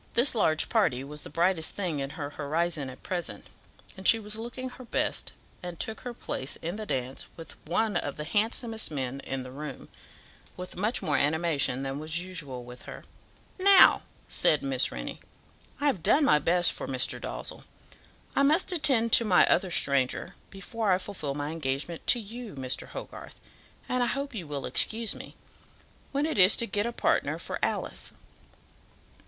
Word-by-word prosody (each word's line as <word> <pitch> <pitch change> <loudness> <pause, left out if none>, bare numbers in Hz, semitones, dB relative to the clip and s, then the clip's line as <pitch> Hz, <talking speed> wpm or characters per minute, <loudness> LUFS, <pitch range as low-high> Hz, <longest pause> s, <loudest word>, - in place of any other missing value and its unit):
This 245 +4 +5
large 160 -9 +3
party 135 - +1
was 150 +2 -9
the - - -10
brightest 165 +1 +1
thing 175 -7 -2
in 135 0 -3
her 145 -2 -4
horizon 155 0 -2
at 130 - -12
present, 175 -2 -4 0.5
and 190 -1 -1
she 225 - +7
was 210 -1 -4
looking 240 +3 -5
her 255 0 -11
best, - - -1 0.3
and 175 -2 -7
took 220 - -3
her 245 -1 -6
place 130 -8 -3
in 170 +3 -5
the 215 -1 -6
dance 130 -3 -3
with 165 - -9
one 210 +5 +1
of 145 -4 -2
the 150 - -4
handsomest 225 +5 0
men 135 -3 -3
in 135 -1 -4
the 130 - -9
room, 145 0 -8 0.7
with 180 0 -7
much 210 +6 0
more 145 -3 +1
animation 145 -3 +1
than 135 +1 -3
was 155 +1 -2
usual 155 -9 -5
with 125 +1 -11
her. - - -9 0.6
"Now," 390 0 +8 0.3
said 150 - +3
Miss 135 -2 +1
Rennie, - - -6 0.6
"I 290 - -1
have 265 - +2
done 285 - +4
my 150 - +5
best 175 +3 +3
for - - -3
Mr. 130 -1 -1
Dalzell. - - -6 0.7
I - - +3
must 310 +7 +4
attend 260 -9 +4
to - - +8
my 190 -5 +5
other 185 +1 +2
stranger 140 -6 +2 0.2
before 210 +1 -2
I 180 - +4
fulfil 180 -7 -5
my 145 +1 -3
engagement 145 +1 -4
to 245 - +5
you, 225 -2 -8
Mr. 130 -1 -2
Hogarth, - - -9 0.5
and 250 0 0
I 245 - +2
hope 275 +2 -2
you 185 -8 -6
will 145 -2 -4
excuse 225 0 +2
me, - - -11 0.8
when 280 +2 0
it 310 -9 -1
is 185 +2 +9
to 235 - +3
get 205 +1 -1
a - - -2
partner - - +1
for - - -5
Alice. - - -2
175 Hz, 180 wpm, -28 LUFS, 145-225 Hz, 0.8 s, is